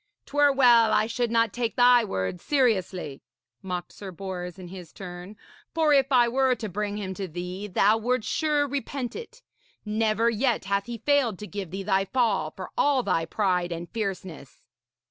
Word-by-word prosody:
''Twere 290 -1 +3
well 240 -4 +6
I 215 - +3
should 235 +1 -1
not 230 -1 +2
take 240 -2 -2
thy 245 -1 +6
words 170 - -3
seriously,' 190 - 0 0.4
mocked 180 -2 -5
Sir 200 - -8
Bors 180 -1 -6
in 180 -2 -10
his 180 -3 -10
turn. 180 +2 -9 0.4
'For 315 -2 +3
if 275 -1 +3
I 245 -2 +5
were 260 +1 +2
to 220 -2 -5
bring 205 +2 -3
him 190 -2 -4
to 195 0 -5
thee, 180 +4 -6
thou 205 +3 +3
wouldst 245 0 -1
sure 295 -2 +1
repent 275 -2 -4
it. 470 +1 -10 0.4
Never 215 +1 +1
yet 235 -2 +1
hath 200 +1 -1
he 240 -1 -5
failed 265 -4 +1
to 210 - -7
give 200 -3 -6
thee 195 +3 -5
thy 195 -1 +1
fall, 205 -9 +1
for 185 +4 -9
all 280 -3 +2
thy 165 -6 0
pride 180 -1 0
and 170 0 -5
fierceness.' 190 - -6
210 Hz, 180 wpm, -26 LUFS, 185-245 Hz, 0.4 s, well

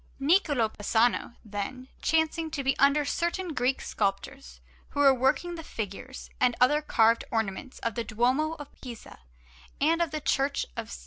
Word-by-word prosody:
Niccola 290 - +3
Pisano, 225 +3 +1
then, 215 +5 -5
chancing 320 0 +1
to 290 -3 -4
be 270 0 +2
under 285 +1 +4
certain 345 +3 -2
Greek 255 0 0
sculptors 200 +8 -3 0.3
who 285 - -5
were 275 -2 +7
working 265 +7 +1
the 330 -1 -7
figures 225 +2 -7
and 245 -2 +3
other 295 +5 +4
carved 230 -5 +3
ornaments 225 +3 -3
of 230 - 0
the 235 - -2
Duomo 250 +8 +1
of 290 -3 -8
Pisa 240 -4 -10 0.6
and 325 +4 +3
of 340 - +1
the 305 +1 -3
Church 280 -1 0
of - - -4
S. 60 - -8
270 Hz, 165 wpm, -28 LUFS, 230-305 Hz, 0.6 s, were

